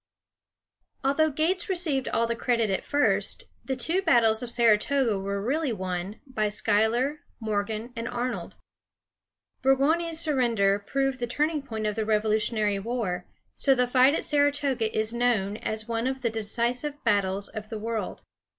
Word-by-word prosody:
Although 280 Hz, +4 st, +3 dB
Gates 335 Hz, +6 st, 0 dB
received 320 Hz, -8 st, 0 dB
all 230 Hz, -, +1 dB
the 235 Hz, 0 st, -1 dB
credit 230 Hz, -3 st, +1 dB
at 190 Hz, -, -1 dB
first, 290 Hz, 0 st, +1 dB, 0.2 s
the 265 Hz, -, -2 dB
two 325 Hz, +9 st, 0 dB
battles 230 Hz, -, +4 dB
of 245 Hz, -, -4 dB
Saratoga 235 Hz, 0 st, +2 dB
were 200 Hz, +1 st, -2 dB
really 275 Hz, +7 st, 0 dB
won 185 Hz, 0 st, -4 dB
by 215 Hz, -6 st, -1 dB
Schuyler, 220 Hz, +8 st, +1 dB, 0.2 s
Morgan, 220 Hz, +2 st, -3 dB
and 230 Hz, 0 st, -4 dB
Arnold. 245 Hz, +1 st, -3 dB, 1.1 s
Burgoyne's 315 Hz, +5 st, +2 dB
surrender 235 Hz, -10 st, +2 dB
proved 270 Hz, +5 st, -1 dB
the 240 Hz, -, -2 dB
turning 300 Hz, +5 st, 0 dB
point 220 Hz, -5 st, -5 dB
of 210 Hz, -1 st, -1 dB
the 220 Hz, -, -1 dB
Revolutionary 215 Hz, -1 st, +1 dB
War, 195 Hz, -5 st, -3 dB, 0.3 s
so 270 Hz, -1 st, +3 dB
the 250 Hz, -1 st, +3 dB
fight 255 Hz, +3 st, +4 dB
at -, -, -3 dB
Saratoga 285 Hz, -5 st, +1 dB
is 220 Hz, +1 st, +1 dB
known 225 Hz, -4 st, +1 dB
as 220 Hz, 0 st, -4 dB
one 230 Hz, +1 st, -1 dB
of 265 Hz, 0 st, -3 dB
the 235 Hz, -3 st, 0 dB
decisive 240 Hz, +6 st, -2 dB
battles 200 Hz, -3 st, +1 dB
of 215 Hz, -1 st, -7 dB
the 220 Hz, -, -4 dB
world. 225 Hz, 0 st, -4 dB
235 Hz, 150 wpm, -27 LUFS, 215-270 Hz, 1.1 s, battles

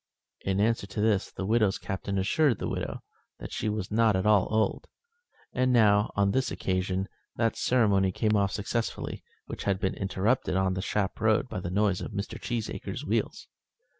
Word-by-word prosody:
In 95 Hz, 0 st, -1 dB
answer 110 Hz, -1 st, +1 dB
to 100 Hz, -, -6 dB
this 105 Hz, -2 st, +2 dB
the 95 Hz, -, -5 dB
widow's 105 Hz, -2 st, +2 dB
Captain 95 Hz, +1 st, -4 dB
assured 120 Hz, +6 st, +2 dB
the -, -, -3 dB
widow -, -, -4 dB, 0.3 s
that -, -, -8 dB
she 110 Hz, -, -2 dB
was 105 Hz, -2 st, -3 dB
not 110 Hz, -1 st, +3 dB
at 95 Hz, +1 st, 0 dB
all 105 Hz, -3 st, +4 dB
old; 110 Hz, 0 st, 0 dB, 0.7 s
and 130 Hz, 0 st, +2 dB
now, 105 Hz, -3 st, +4 dB
on 100 Hz, -1 st, +3 dB
this 130 Hz, +4 st, +1 dB
occasion, 95 Hz, +1 st, -1 dB, 0.3 s
that 115 Hz, -1 st, +1 dB
ceremony 100 Hz, -6 st, +3 dB
came 110 Hz, +3 st, +1 dB
off 100 Hz, -1 st, +2 dB
successfully 115 Hz, +3 st, -3 dB, 0.2 s
which -, -, -7 dB
had 95 Hz, -2 st, +1 dB
been 95 Hz, -, 0 dB
interrupted 100 Hz, +3 st, 0 dB
on 95 Hz, 0 st, +2 dB
the 95 Hz, -, -2 dB
Shap 100 Hz, -1 st, -2 dB
road -, -, +3 dB
by -, -, -4 dB
the 85 Hz, -, -4 dB
noise 100 Hz, 0 st, +1 dB
of -, -, -6 dB
Mr. 100 Hz, -, -5 dB
Cheesacre's 120 Hz, -3 st, -4 dB
wheels. -, -, -1 dB
100 Hz, 180 wpm, -28 LUFS, 95-110 Hz, 0.7 s, all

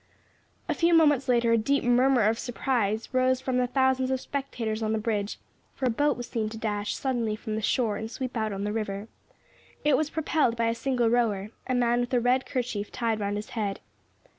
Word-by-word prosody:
A -, -, +1 dB
few 335 Hz, 0 st, +3 dB
moments 295 Hz, -5 st, +4 dB
later 240 Hz, -2 st, +3 dB
a 230 Hz, -, +4 dB
deep 275 Hz, +6 st, +1 dB
murmur 250 Hz, 0 st, +4 dB
of 220 Hz, +2 st, +2 dB
surprise 230 Hz, -4 st, -1 dB
rose 255 Hz, 0 st, +3 dB
from 260 Hz, -1 st, -1 dB
the 250 Hz, -, +2 dB
thousands 260 Hz, 0 st, +2 dB
of 265 Hz, -1 st, 0 dB
spectators 245 Hz, -6 st, -3 dB
on 220 Hz, 0 st, 0 dB
the -, -, +1 dB
bridge, 210 Hz, -2 st, -2 dB, 0.4 s
for 265 Hz, -, -2 dB
a 250 Hz, -, +3 dB
boat 290 Hz, +5 st, +1 dB
was 245 Hz, -1 st, -6 dB
seen 220 Hz, -3 st, -2 dB
to 220 Hz, -, -8 dB
dash 210 Hz, -2 st, -2 dB
suddenly 240 Hz, -5 st, -1 dB
from 215 Hz, 0 st, -6 dB
the 215 Hz, -, -2 dB
shore 220 Hz, 0 st, +1 dB
and 220 Hz, -, -5 dB
sweep 255 Hz, +1 st, -5 dB
out 220 Hz, -2 st, -1 dB
on 195 Hz, 0 st, -4 dB
the 210 Hz, 0 st, -2 dB
river. 210 Hz, -1 st, -3 dB, 0.8 s
It 295 Hz, -2 st, +5 dB
was 300 Hz, +2 st, 0 dB
propelled 310 Hz, -6 st, +1 dB
by 230 Hz, 0 st, +2 dB
a -, -, +1 dB
single 240 Hz, -1 st, 0 dB
rower 215 Hz, -4 st, +1 dB, 0.2 s
a 255 Hz, -, 0 dB
man 240 Hz, -1 st, +2 dB
with 245 Hz, +1 st, -1 dB
a -, -, +4 dB
red 250 Hz, +2 st, +2 dB
kerchief 230 Hz, -5 st, -3 dB
tied 230 Hz, -3 st, -1 dB
round 205 Hz, 0 st, -1 dB
his 210 Hz, +1 st, -6 dB
head. 205 Hz, -4 st, -2 dB
235 Hz, 215 wpm, -27 LUFS, 215-260 Hz, 0.8 s, It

